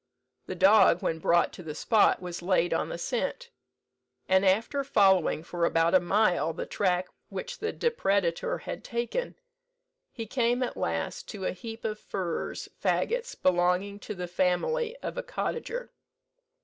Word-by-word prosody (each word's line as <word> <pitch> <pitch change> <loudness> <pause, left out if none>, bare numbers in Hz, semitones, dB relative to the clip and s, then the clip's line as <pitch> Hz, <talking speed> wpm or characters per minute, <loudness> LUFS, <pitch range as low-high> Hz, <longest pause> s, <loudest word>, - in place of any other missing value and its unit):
The 185 - -4
dog, 190 -1 +5
when 160 - -1
brought 170 +2 +2
to - - -9
the 155 -3 -7
spot, 210 +1 +3
was 175 -1 -5
laid 175 -1 +2
on - - -1
the - - -4
scent; 275 - -3 0.8
and 190 +1 +4
after 225 +9 +2
following 190 - +3
for 175 0 -4
about 165 0 +3
a 185 - +7
mile 175 -4 +2
the - - -4
track 180 -2 0 0.2
which - - -6
the 440 - -2
depredator 200 - 0
had - - -6
taken, 240 - -3 0.8
he 230 - -6
came 245 +2 +1
at 245 - -3
last 80 -1 -3
to 195 -3 -6
a - - +1
heap 225 +4 -8
of 215 -1 -2
furze 180 -4 -4 0.2
fagots 485 +1 0
belonging 180 +3 +1
to 210 - -7
the 180 -1 -5
family 440 - 0
of - - -4
a - - -4
cottager. - - -4
195 Hz, 155 wpm, -28 LUFS, 175-245 Hz, 0.8 s, a